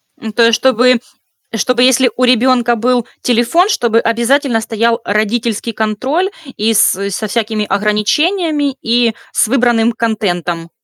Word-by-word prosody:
Ну, 220 - -7
то 235 +2 +2
есть, 230 - +3
чтобы 250 0 +3 0.6
чтобы 245 +3 0
если 255 -1 +3
у 255 - +1
ребёнка 245 -1 +2
был 240 +1 0 0.2
телефон, 245 - +2
чтобы 235 - +1
обязательно 235 +1 0
стоял 230 +1 -1
родительский 220 +2 -2
контроль 260 - -1 0.3
и 225 +2 +1
с 200 -1 +2
со 205 +3 -4
всякими 215 -1 -2
ограничениями, 290 - 0
и 230 -1 +1 0.2
с - - +1
выбранным 240 -2 +2
контентом. 175 -7 -3
235 Hz, 135 wpm, -14 LUFS, 215-255 Hz, 0.6 s, есть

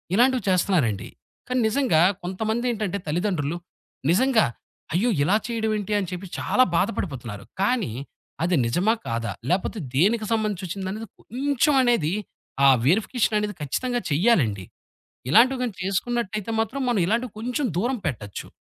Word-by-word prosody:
ఇలాంటివి 250 +1 +3
చేస్తన్నారండి. 170 - +1 0.4
కానీ 255 0 0
నిజంగా 220 - +2 0.2
కొంతమందేంటంటే 215 +1 -1
తల్లిదండ్రులు 170 -1 -1 0.5
నిజంగా 235 +4 +4 0.5
అయ్యో! 210 +9 +2
ఇలా 190 +7 +3
చేయడమేంటి 220 -3 -2
అని 185 -3 -3
చెప్పి 180 +2 -5
చాలా 255 - +3
బాధపడిపోతున్నారు. 130 - -2 0.2
కానీ 205 - +1 0.5
అది 175 +1 +2
నిజమా? 180 - +2
కాదా? 115 0 -2 0.2
లేపోతే 185 +5 0 0.2
దేనికి 215 - +3
సంబంధించొచ్చిందనేది 200 -1 -2
కొంచెం 280 +4 +1
అనేది 210 -10 +2 0.5
ఆ - - +8 0.2
వెరిఫికేషననేది 210 - +1
ఖచ్చితంగా 245 - -1
చెయ్యాలండి. 140 - +2 0.6
ఇలాంటివి 250 - +5
గానీ 235 -5 -2
చేసుకున్నట్టయితే 215 +1 -2
మాత్రం 235 +5 -1
మనం 225 -6 +2
ఇలాంటివి 230 +2 0
కొంచెం 250 +5 -1
దూరం 245 +7 0
పెట్టచ్చు. 105 -8 -5
210 Hz, 115 wpm, -24 LUFS, 175-240 Hz, 0.6 s, ఆ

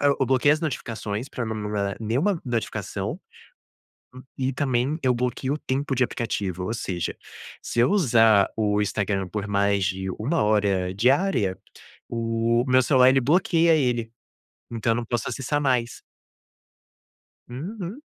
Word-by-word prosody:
ah, - - +2
eu 135 - +2
bloqueei 130 +2 +3
as 155 - -1
notificações 115 -6 -4
pra 120 -3 -4
não 110 - -3
me 105 -1 -4
mandar 100 -2 -2
nenhuma 140 - 0
notificação, 120 -3 -3 1.1
hum, 130 - -9 0.2
e 130 0 0
também 135 +2 0
eu 130 -1 +2
bloqueio 125 +3 -1
o - - -2
tempo 135 -1 -2
de 125 - +3
aplicativo, 95 -7 -3
ou 110 - -2
seja, 90 -7 -3 0.5
se - - -3
eu 120 +3 +5
usar 115 - +4
o 105 -1 +1
Instagram 100 -2 -1
por 105 0 -4
mais 100 -1 +1
de 95 0 -2
1 145 +10 0
hora 100 -3 +1
diária, 120 - +2 0.5
o 115 +1 0
meu 130 0 +5
celular 130 -1 +4
ele 135 0 +3
bloqueia 165 +3 +3
ele, 120 -6 0 0.6
então 115 0 0
eu - - -2
não 120 - -3
posso 120 -1 -2
acessar 135 +4 -2
mais. 125 -4 0 1.5
Uhum. 180 - -6
120 Hz, 150 wpm, -24 LUFS, 105-135 Hz, 1.5 s, eu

